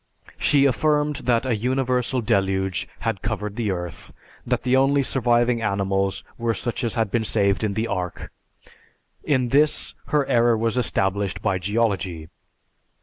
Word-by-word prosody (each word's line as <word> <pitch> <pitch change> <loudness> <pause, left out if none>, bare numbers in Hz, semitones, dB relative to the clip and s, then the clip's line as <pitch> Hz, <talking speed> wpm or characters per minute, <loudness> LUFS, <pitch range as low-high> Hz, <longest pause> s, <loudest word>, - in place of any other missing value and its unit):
She 140 -1 +4
affirmed 150 +3 +1
that 120 0 +2
a 125 -3 +1
universal 125 +2 0
deluge 95 -3 0
had 95 - -2
covered 105 -1 -3
the 115 -3 -1
earth; 90 -3 -5 0.4
that 125 -1 0
the 130 0 +2
only 135 +1 +3
surviving 120 -2 +1
animals 100 -2 -1 0.2
were 115 -1 0
such 120 0 -4
as 115 -1 -1
had 110 -4 0
been 115 +1 +1
saved 100 -2 +1
in 105 -2 -1
the 110 - 0
Ark. 90 -5 -4 0.9
In 130 -5 +1
this, 150 +4 +2
her 150 -2 +1
error 115 -1 +3
was 115 +1 0
established 100 -5 -1
by 95 -3 +1
geology. 95 -5 -1
115 Hz, 145 wpm, -23 LUFS, 100-125 Hz, 0.9 s, She